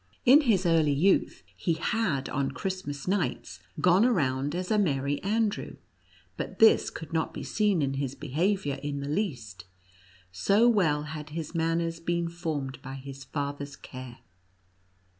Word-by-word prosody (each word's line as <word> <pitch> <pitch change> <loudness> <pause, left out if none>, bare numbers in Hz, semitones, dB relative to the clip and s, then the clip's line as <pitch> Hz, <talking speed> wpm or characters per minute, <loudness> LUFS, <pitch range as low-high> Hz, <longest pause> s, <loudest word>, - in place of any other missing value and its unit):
In 270 +5 +8
his 210 - +2
early 160 -4 +3
youth 190 +7 +2
he 170 - 0
had 165 -6 -1
on 135 0 -1
Christmas 185 -4 -4
nights 180 -9 -1 0.2
gone 180 +5 +5
around 145 - +1
as 180 +2 -3
a 215 - +3
Merry 140 -6 0
Andrew, 215 +1 -1 0.6
but - - -5
this 225 - +6
could 160 -1 -9
not 160 -1 -1
be - - -5
seen 205 -7 +1
in 135 -1 0
his 135 -1 -3
behavior 165 -1 -1
in 140 -1 -3
the 140 - -4
least, 125 - -3 0.7
so 200 - +3
well 165 -11 +3
had 150 0 -7
his 160 +1 -5
manners 165 0 0
been 170 0 -1
formed 155 -6 -4
by 135 +1 -7
his 135 0 -9
fathers 140 0 -4
care. 130 -2 -10
160 Hz, 150 wpm, -28 LUFS, 140-190 Hz, 0.7 s, In